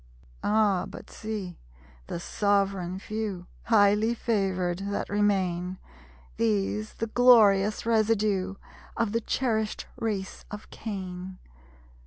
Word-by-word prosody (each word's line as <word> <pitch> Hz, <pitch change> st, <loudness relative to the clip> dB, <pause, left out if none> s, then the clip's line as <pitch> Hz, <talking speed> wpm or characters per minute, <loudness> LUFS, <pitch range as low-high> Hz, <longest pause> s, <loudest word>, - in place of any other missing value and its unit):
Ah, 205 Hz, -3 st, +2 dB
but -, -, -11 dB
see 210 Hz, -5 st, -5 dB, 0.5 s
the -, -, -4 dB
sovereign 195 Hz, -1 st, 0 dB
Few, 205 Hz, -3 st, -4 dB, 0.2 s
Highly 215 Hz, +1 st, +4 dB
favored, 190 Hz, -6 st, 0 dB
that 200 Hz, +1 st, -3 dB
remain! 185 Hz, -3 st, 0 dB, 0.6 s
These, 105 Hz, -1 st, 0 dB
the 225 Hz, -, -2 dB
glorious 215 Hz, -4 st, +5 dB
residue, 215 Hz, -4 st, +1 dB, 0.4 s
Of 230 Hz, -3 st, +1 dB
the 230 Hz, +1 st, 0 dB
cherished 220 Hz, -3 st, -1 dB
race 200 Hz, -4 st, -3 dB
of 210 Hz, 0 st, -9 dB
Cain. 185 Hz, -3 st, -6 dB
200 Hz, 100 wpm, -27 LUFS, 185-220 Hz, 0.6 s, glorious